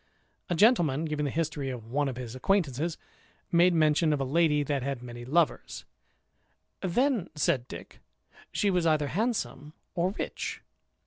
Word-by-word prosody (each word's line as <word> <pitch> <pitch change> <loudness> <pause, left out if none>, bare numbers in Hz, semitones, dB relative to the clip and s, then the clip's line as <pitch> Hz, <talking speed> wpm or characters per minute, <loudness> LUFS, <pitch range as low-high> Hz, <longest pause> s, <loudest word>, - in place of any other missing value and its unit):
A 175 - +1
gentleman 165 - +4
giving 150 -1 -2
the - - 0
history 155 -2 -2
of 125 -4 -6
one 145 +1 +1
of 130 - -5
his 120 -3 -6
acquaintance, 160 0 0 0.5
made 175 +1 +5
mention 155 0 +3
of 145 - -1
a - - 0
lady 150 +1 +2
that 140 -1 -1
had 135 -1 -3
many 120 -1 -8
lovers: 155 +4 0 1.0
"Then," 230 +1 +1
said 130 -4 +1
Dick, - - -10 0.5
"she 205 - +1
was 180 -2 +1
either 150 -2 +2
handsome 200 - -2 0.2
or 180 0 +1
rich." - - -4
155 Hz, 150 wpm, -28 LUFS, 140-175 Hz, 1.0 s, made